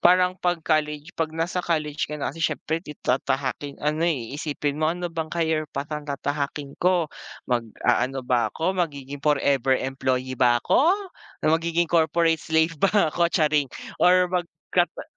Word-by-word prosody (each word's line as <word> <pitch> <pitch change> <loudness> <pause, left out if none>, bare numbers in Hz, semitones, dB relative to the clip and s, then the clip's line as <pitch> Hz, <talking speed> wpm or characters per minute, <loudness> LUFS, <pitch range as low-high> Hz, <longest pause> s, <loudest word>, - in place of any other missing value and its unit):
parang 180 +1 +4
'pag 175 -1 0
college 150 +1 0
'pag 160 -1 -2
nasa 175 +2 -1
college 155 -4 -1
ka 150 - -4
na 145 - -3
kasi 165 - -10
siyempre 160 +1 -1
ti 150 -2 -10
tatahaking 135 +2 -1
ano, 150 +2 0
eh, 130 -8 -2
iisipin 145 -1 -2
mo 155 - +3
ano 175 0 -3
bang 160 -1 -3
career 160 -2 0
path 140 +2 -5
ang 150 0 -5
tatahakin 140 0 -3
ko? 175 -3 +2 0.3
Mag-aano 125 +2 0
ba 125 -1 +2
ako 170 +4 -1
magiging 145 -6 -3
forever 140 -3 +2
employee 130 -1 -2
ba 120 -1 +4
ako, 305 - +4 0.6
na 155 - +4
magiging 170 +1 +1
corporate 165 0 +2
slave 160 +1 +2
ba 195 - +5 0.2
ako? 170 -1 +2
Charing! 150 -4 +2 0.3
Or 180 0 +5
mag 175 -2 0 0.2
ka - - +5
ka - - -9
155 Hz, 165 wpm, -24 LUFS, 140-170 Hz, 0.6 s, ba